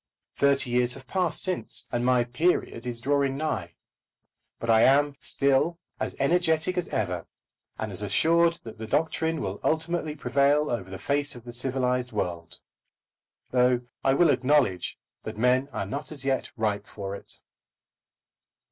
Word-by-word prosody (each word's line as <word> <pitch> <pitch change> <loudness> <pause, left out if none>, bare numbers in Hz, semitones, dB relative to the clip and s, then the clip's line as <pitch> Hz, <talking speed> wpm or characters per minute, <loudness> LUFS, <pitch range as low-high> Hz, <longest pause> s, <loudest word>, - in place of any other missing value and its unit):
Thirty 140 -2 +3
years 125 0 +2
have 135 -1 -12
passed 180 +3 0
since, 185 -2 -2
and 120 - -1
my 125 -1 +3
"period" 125 -1 -1
is 120 -1 -4
drawing 140 0 +1
nigh. 95 - -3 0.8
But 115 - -6
I 110 0 +5
am 145 +2 +4
still 140 +5 +2 0.2
as - - -2
energetic 165 +3 +2
as 180 -2 0
ever, 90 -5 -2 0.5
and 110 -1 -4
as 95 - -3
assured 165 - +3
that 110 -1 -10
the 110 - -6
doctrine 160 +4 0
will 95 0 -4
ultimately 160 -1 -1
prevail 140 +2 +2
over 95 -6 -3
the 95 - -6
face 145 +3 +1
of 120 - -11
the 120 0 -9
civilised 125 0 0
world, 85 -5 -4 0.9
though 125 -1 +3 0.2
I 135 0 +3
will 165 0 +5
acknowledge 130 - +1 0.2
that 110 -1 -7
men 125 +4 +2
are - - -3
not 140 +12 -5
as 140 -3 -5
yet 135 -1 0
ripe 105 -2 -1
for 100 -1 -6
it. - - -9
130 Hz, 155 wpm, -26 LUFS, 115-150 Hz, 0.9 s, I